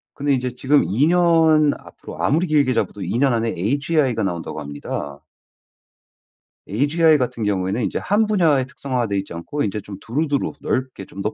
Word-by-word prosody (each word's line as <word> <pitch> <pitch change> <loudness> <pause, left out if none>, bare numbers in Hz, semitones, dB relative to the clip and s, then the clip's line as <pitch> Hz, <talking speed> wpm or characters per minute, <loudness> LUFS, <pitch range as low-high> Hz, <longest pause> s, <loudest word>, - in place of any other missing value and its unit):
근데 145 0 0
인제 125 -1 0
지금 135 +4 +2
2 130 +9 +2
년 165 -4 +4
앞으로 - - -11
아무리 165 +6 +2
길게 145 -5 +2
잡아도 105 - -2
2 115 - -2
년 135 0 +3
안에 115 0 0
agi가 140 - 0
나온다고 85 -4 -4
합니다. 70 -1 -6 1.5
agi 150 - +3
같은 125 -3 -2
경우에는 100 +2 -1
이제 - - -2
1 210 +3 +1
분야에 165 -11 +2
특성화 130 -3 -3
되어있지 100 -2 -3
않고 85 +13 -4
인제 105 +1 -2
좀 100 -1 -9
두루두루 145 +4 -1
넓게 130 -6 -3
좀 100 - -9
더 105 - -2
130 Hz, 350 characters per minute, -21 LUFS, 105-150 Hz, 1.5 s, 년